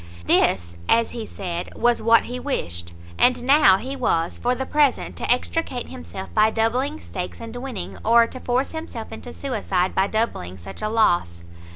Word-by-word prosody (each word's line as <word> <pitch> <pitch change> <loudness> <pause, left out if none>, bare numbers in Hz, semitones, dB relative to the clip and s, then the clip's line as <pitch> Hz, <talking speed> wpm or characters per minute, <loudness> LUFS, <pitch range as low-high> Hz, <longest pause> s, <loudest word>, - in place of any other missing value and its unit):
This, 85 -1 +2
as 230 0 +3
he 230 -2 -6
said, 175 -3 -5
was 240 0 +2
what 230 +1 +5
he 250 +1 -5
wished; 85 - -4 0.3
and 245 -1 +4
now 265 -8 +6
he 265 +6 -5
was, 170 -10 0
for 245 +1 +1
the 265 - -3
present, 290 -2 +1
to - - 0
extricate 250 0 0
himself 85 +2 -8
by 215 - +5
doubling 250 +7 0
stakes 180 -1 -6
and 230 0 -8
winning, 245 -4 -6
or 230 +1 +6
to 255 - -8
force 250 +2 0
himself 315 -9 -7
into 235 +2 -8
suicide 200 -9 -1
by 190 +1 +2
doubling 200 - -2
such 95 +2 -10
a 215 - -1
loss. 175 - +1
230 Hz, 175 wpm, -23 LUFS, 180-250 Hz, 0.3 s, now